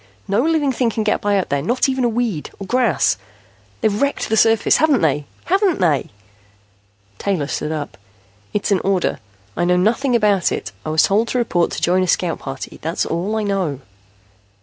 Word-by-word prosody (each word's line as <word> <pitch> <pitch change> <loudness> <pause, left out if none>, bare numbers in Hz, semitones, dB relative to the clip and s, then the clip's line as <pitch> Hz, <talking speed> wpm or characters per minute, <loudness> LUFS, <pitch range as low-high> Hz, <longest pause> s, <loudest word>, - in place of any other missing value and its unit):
No 200 +3 +2
living 305 -2 +1
thing 245 -1 +1
can 220 -1 -2
get 210 - 0
by 205 -1 +1
up 190 - -1
there, 140 0 0
not 240 - +1
even 260 -1 0
a 240 - +3
weed, 225 -9 -2
or 195 - -7
grass. 180 - +1 0.6
They've 210 -1 +1
wrecked 280 0 0
the 220 - +2
surface, 225 0 +4
haven't 305 -5 +3
they? 150 -2 +1 0.2
Haven't 385 -1 +2
they?" 160 -7 +1 1.1
Taylor 190 -8 -1
stood 150 +1 -3
up. 150 -8 -5 0.5
"It's 210 0 -1
an 195 - +3
order. 190 -2 0 0.4
I 175 - 0
know 180 +1 +3
nothing 240 +7 +2
about 205 -5 +2
it. - - -4
I - - -4
was 155 0 +3
told 210 +4 +2
to 250 - -1
report 180 -8 +1
to - - -4
join 180 +2 +3
a 185 - 0
scout 175 -1 0
party. 135 -1 -7
That's 165 +2 -1
all 180 +6 -2
I 220 - -1
know." 190 -9 -1
200 Hz, 195 wpm, -19 LUFS, 170-235 Hz, 1.1 s, surface